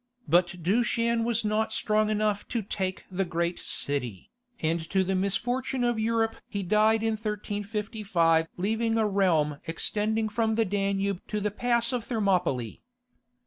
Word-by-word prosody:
But 175 Hz, +2 st, +2 dB
Dushan 230 Hz, +4 st, +1 dB
was 230 Hz, -1 st, 0 dB
not 215 Hz, +1 st, +1 dB
strong 215 Hz, -1 st, +1 dB
enough 210 Hz, -1 st, 0 dB
to 235 Hz, -3 st, -2 dB
take 190 Hz, -1 st, -3 dB
the 190 Hz, +1 st, 0 dB
great 170 Hz, 0 st, -2 dB
city, 125 Hz, -9 st, -1 dB, 0.3 s
and 165 Hz, +1 st, 0 dB
to 190 Hz, -1 st, +2 dB
the 190 Hz, +1 st, -1 dB
misfortune 245 Hz, +7 st, -1 dB
of 240 Hz, -2 st, +1 dB
Europe 225 Hz, 0 st, +1 dB
he 200 Hz, -1 st, -4 dB
died 215 Hz, +4 st, +3 dB
in 225 Hz, -, +2 dB
1355 205 Hz, -5 st, 0 dB
leaving 225 Hz, +4 st, 0 dB
a 220 Hz, -1 st, +2 dB
realm 165 Hz, -8 st, +2 dB
extending 215 Hz, +6 st, 0 dB
from 220 Hz, 0 st, 0 dB
the 225 Hz, 0 st, +2 dB
Danube 195 Hz, -1 st, -1 dB
to 210 Hz, -, -2 dB
the 210 Hz, 0 st, -1 dB
pass 235 Hz, +2 st, +1 dB
of 245 Hz, -2 st, -1 dB
Thermopylae. 180 Hz, -, 0 dB
210 Hz, 145 wpm, -27 LUFS, 185-225 Hz, 0.3 s, died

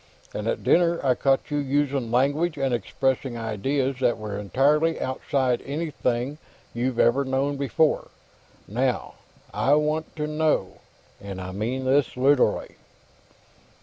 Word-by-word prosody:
And -, -, -4 dB
at -, -, -1 dB
dinner, 170 Hz, -1 st, +3 dB
I 130 Hz, -, +5 dB
caught 135 Hz, +3 st, +1 dB
you 145 Hz, -, 0 dB
using 140 Hz, -3 st, 0 dB
language 145 Hz, +7 st, +1 dB
and 135 Hz, -2 st, 0 dB
expressing 130 Hz, +2 st, -1 dB
ideas 130 Hz, +5 st, -1 dB
that 125 Hz, -2 st, +2 dB
were 105 Hz, -2 st, -5 dB
entirely 150 Hz, +10 st, +2 dB
outside 130 Hz, -1 st, 0 dB
anything 140 Hz, -2 st, -2 dB, 0.3 s
you'd 120 Hz, +1 st, -1 dB
ever 130 Hz, +4 st, +4 dB
known 135 Hz, +2 st, 0 dB
before. 140 Hz, +3 st, +1 dB, 0.6 s
Now, -, -, -1 dB, 0.4 s
I 140 Hz, -, +3 dB
want 150 Hz, +1 st, -1 dB
to 150 Hz, -1 st, -2 dB
know 150 Hz, -9 st, 0 dB, 0.4 s
and 100 Hz, -2 st, -7 dB
I 95 Hz, 0 st, -6 dB
mean 120 Hz, +7 st, -3 dB
this 135 Hz, -1 st, +2 dB
literally." 135 Hz, +1 st, +2 dB
135 Hz, 130 wpm, -25 LUFS, 125-145 Hz, 0.6 s, I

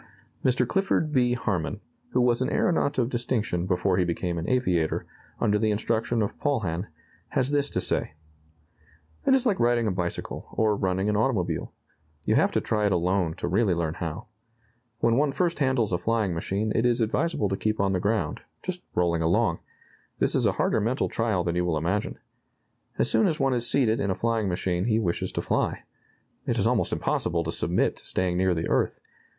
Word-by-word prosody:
Mr. 125 Hz, -1 st, +2 dB
Clifford 190 Hz, -4 st, +1 dB
B. 125 Hz, -3 st, +3 dB
Harmon, 105 Hz, -5 st, -2 dB, 0.3 s
who 125 Hz, -, +1 dB
was 120 Hz, 0 st, +2 dB
an 130 Hz, -, +1 dB
aeronaut 150 Hz, -4 st, +1 dB
of 120 Hz, -3 st, +2 dB
distinction 115 Hz, -7 st, -1 dB
before 90 Hz, 0 st, +1 dB
he 90 Hz, -, +3 dB
became 85 Hz, 0 st, -2 dB
an 85 Hz, -, -4 dB
aviator, 90 Hz, -11 st, +1 dB, 0.3 s
under 105 Hz, 0 st, +2 dB
the 110 Hz, 0 st, +2 dB
instruction 115 Hz, +2 st, 0 dB
of 100 Hz, -, -4 dB
Paulhan, 105 Hz, -, -1 dB, 0.4 s
has 130 Hz, +1 st, 0 dB
this 145 Hz, -1 st, +1 dB
to -, -, -1 dB
say: -, -, 0 dB, 1.1 s
"It 265 Hz, -, +6 dB
is 265 Hz, -1 st, +1 dB
like 210 Hz, -6 st, +2 dB
riding 120 Hz, -1 st, +3 dB
a 105 Hz, -, +1 dB
bicycle, 90 Hz, -1 st, -4 dB
or 110 Hz, -1 st, +2 dB
running 95 Hz, 0 st, 0 dB
an 105 Hz, -, +1 dB
automobile. 105 Hz, -5 st, 0 dB, 0.5 s
You -, -, +2 dB
have -, -, +3 dB
to -, -, +1 dB
try 105 Hz, -1 st, +1 dB
it -, -, 0 dB
alone 90 Hz, -1 st, +1 dB
to -, -, -4 dB
really 95 Hz, +1 st, +2 dB
learn 80 Hz, -2 st, -1 dB
how. 85 Hz, +7 st, -5 dB, 0.8 s
When 115 Hz, 0 st, +3 dB
one 145 Hz, 0 st, +2 dB
first 170 Hz, +3 st, 0 dB
handles 130 Hz, -8 st, +1 dB
a 90 Hz, -, +1 dB
flying 110 Hz, -1 st, 0 dB
machine 100 Hz, +6 st, -2 dB
it 115 Hz, -, +1 dB
is 120 Hz, 0 st, +2 dB
advisable 115 Hz, +2 st, 0 dB
to 95 Hz, -, 0 dB
keep 110 Hz, +2 st, -1 dB
on 100 Hz, -1 st, +2 dB
the 90 Hz, -, +1 dB
ground, 100 Hz, -5 st, -1 dB, 0.2 s
just 180 Hz, -1 st, -4 dB
rolling 85 Hz, -2 st, +1 dB
along. 80 Hz, +1 st, +2 dB, 0.6 s
This -, -, +1 dB
is -, -, +2 dB
a -, -, +2 dB
harder -, -, +1 dB
mental 120 Hz, +6 st, 0 dB
trial 110 Hz, -6 st, 0 dB
than 85 Hz, 0 st, -1 dB
you 90 Hz, -, +1 dB
will 85 Hz, -3 st, 0 dB
imagine. 90 Hz, +7 st, -1 dB, 0.8 s
As -, -, +2 dB
soon 215 Hz, -, +3 dB
as 160 Hz, -4 st, -1 dB
one 135 Hz, -1 st, +2 dB
is 120 Hz, -1 st, 0 dB
seated 120 Hz, -5 st, +2 dB
in 100 Hz, -, 0 dB
a 95 Hz, -, 0 dB
flying 115 Hz, -2 st, 0 dB
machine 90 Hz, +1 st, -1 dB
he 110 Hz, -2 st, +2 dB
wishes 90 Hz, -7 st, -1 dB
to -, -, -2 dB
fly. -, -, -1 dB, 0.6 s
It -, -, +1 dB
is -, -, +2 dB
almost -, -, +1 dB
impossible 85 Hz, 0 st, 0 dB
to 80 Hz, -, -3 dB
submit -, -, 0 dB
to -, -, -9 dB
staying 90 Hz, -1 st, +1 dB
near 95 Hz, -1 st, +2 dB
the 80 Hz, -, -2 dB
earth. -, -, 0 dB
105 Hz, 200 wpm, -26 LUFS, 90-120 Hz, 1.1 s, It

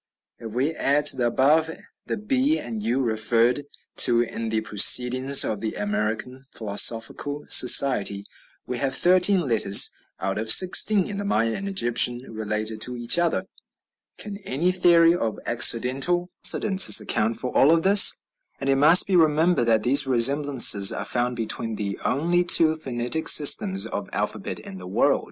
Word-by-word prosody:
If 115 Hz, -1 st, -10 dB
we 135 Hz, +5 st, -2 dB
add 145 Hz, -2 st, -3 dB
to -, -, +2 dB
the 120 Hz, -2 st, -1 dB
above 150 Hz, +6 st, 0 dB, 0.4 s
the -, -, -5 dB
b 265 Hz, +8 st, -2 dB
and 110 Hz, -3 st, -8 dB
u, 120 Hz, +5 st, -3 dB
referred 115 Hz, +3 st, 0 dB, 0.3 s
to 120 Hz, -2 st, +3 dB
in 115 Hz, -1 st, -7 dB
the 110 Hz, 0 st, -3 dB
"Proceedings 125 Hz, +5 st, +3 dB
of 105 Hz, -2 st, -5 dB
the 110 Hz, -, -6 dB
American 105 Hz, +5 st, -6 dB
Philosophical 115 Hz, +7 st, -1 dB
Society," 105 Hz, -6 st, +3 dB, 0.4 s
we 125 Hz, -1 st, -7 dB
have 135 Hz, -1 st, -3 dB
thirteen 185 Hz, +3 st, +1 dB
letters 115 Hz, -, +3 dB, 0.3 s
out 95 Hz, +2 st, -5 dB
of 110 Hz, 0 st, -5 dB
sixteen 190 Hz, -, +5 dB
in 205 Hz, -, -8 dB
the 205 Hz, -, -6 dB
Maya 115 Hz, -, -3 dB
and 200 Hz, 0 st, -7 dB
Egyptian 120 Hz, -8 st, 0 dB
related 110 Hz, 0 st, -5 dB
to 125 Hz, +2 st, 0 dB
each 120 Hz, +7 st, +1 dB
other. 170 Hz, -1 st, -3 dB, 0.7 s
Can 205 Hz, -1 st, -9 dB
any 175 Hz, -2 st, -4 dB
theory 170 Hz, -2 st, +2 dB
of 115 Hz, -11 st, -5 dB
accidental 135 Hz, +10 st, +1 dB
coincidences 195 Hz, -2 st, +3 dB
account 110 Hz, +2 st, -4 dB
for 125 Hz, -, -8 dB
all 160 Hz, +5 st, +2 dB
this? 195 Hz, +4 st, +4 dB, 0.4 s
And 135 Hz, 0 st, -3 dB
it 135 Hz, -, -1 dB
must 155 Hz, +6 st, +4 dB
be 195 Hz, -, -3 dB
remembered 160 Hz, -3 st, 0 dB
that 110 Hz, -2 st, 0 dB
these 135 Hz, +3 st, +2 dB
resemblances 130 Hz, -5 st, +2 dB
are -, -, -8 dB
found 125 Hz, 0 st, -4 dB
between 115 Hz, -1 st, -6 dB
the 100 Hz, -2 st, -7 dB
only 170 Hz, +6 st, -2 dB
two 165 Hz, -2 st, +2 dB
phonetic 130 Hz, 0 st, -6 dB
systems 190 Hz, +6 st, +3 dB
of -, -, -8 dB
alphabet -, -, -6 dB
in 95 Hz, -, -13 dB
the 90 Hz, -, -12 dB
world. 95 Hz, -, -1 dB
130 Hz, 160 wpm, -21 LUFS, 115-165 Hz, 0.7 s, sixteen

